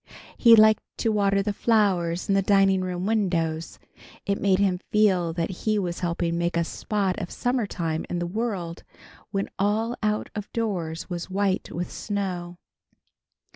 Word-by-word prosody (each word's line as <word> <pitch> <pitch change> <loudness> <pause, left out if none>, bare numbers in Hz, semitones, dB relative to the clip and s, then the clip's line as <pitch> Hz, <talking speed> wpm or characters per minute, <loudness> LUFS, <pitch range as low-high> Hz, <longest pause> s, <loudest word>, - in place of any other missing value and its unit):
He 230 -2 +7
liked 215 0 +6 0.2
to 225 - +1
water 200 -1 +2
the 205 - -1
flowers 190 -6 +1
in 200 - +2
the 195 - +3
dining 195 -1 +3
room 180 0 -3
windows. 170 -7 -1 0.5
It 200 0 -1
made 195 -2 +3
him 190 -2 +1
feel 190 -6 +3
that 165 +1 -2
he 215 +3 -1
was 175 -4 -2
helping 170 -1 -1
make 170 0 0
a 170 - +2
spot 195 +1 -2
of 180 - -4
summertime 200 -10 -2
in 175 - -2
the 175 - -1
world, 185 -4 -3 0.5
when 195 0 -2
all 220 +4 +1
out 210 -1 -1
of 210 -1 -6
doors 180 -8 -2
was 175 -1 -5
white 195 0 0
with 175 +1 -4
snow. 180 -4 -4
195 Hz, 160 wpm, -25 LUFS, 175-210 Hz, 0.5 s, He